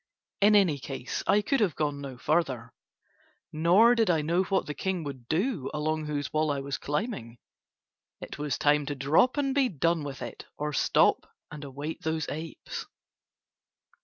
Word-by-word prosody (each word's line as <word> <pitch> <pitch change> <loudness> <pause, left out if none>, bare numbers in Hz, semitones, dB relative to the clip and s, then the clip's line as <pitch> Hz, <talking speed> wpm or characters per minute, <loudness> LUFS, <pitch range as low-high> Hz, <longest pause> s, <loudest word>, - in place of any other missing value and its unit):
In 210 +1 +6
any 175 -8 +4
case 135 -1 -5
I 205 +1 +4
could 275 - +1
have 200 -8 +1
gone 145 -2 -1
no 135 -3 -7
farther, 130 -6 -1 0.8
nor 180 +10 +5
did 225 -4 +2
I 160 -3 +2
know 170 +4 +2
what 190 0 0
the 150 - -4
king 185 +3 -2
would 135 -5 -7
do 175 - -1
along 155 0 -1
whose 145 -2 -3
wall 155 0 +1
I 140 -1 0
was 140 0 -4
climbing. 145 - -3 0.8
It - - -8
was 145 -3 -1
time 145 -1 +2
to 145 - -2
drop 155 - +3
and 275 -2 +1
be 270 -2 +3
done 165 -1 0
with 140 -2 -6
it - - -8
or 150 0 -3
stop - - +2 0.2
and 150 0 -8
await 145 +3 -6
those 160 -1 -2
apes. 160 +2 -6
155 Hz, 170 wpm, -28 LUFS, 140-185 Hz, 0.8 s, In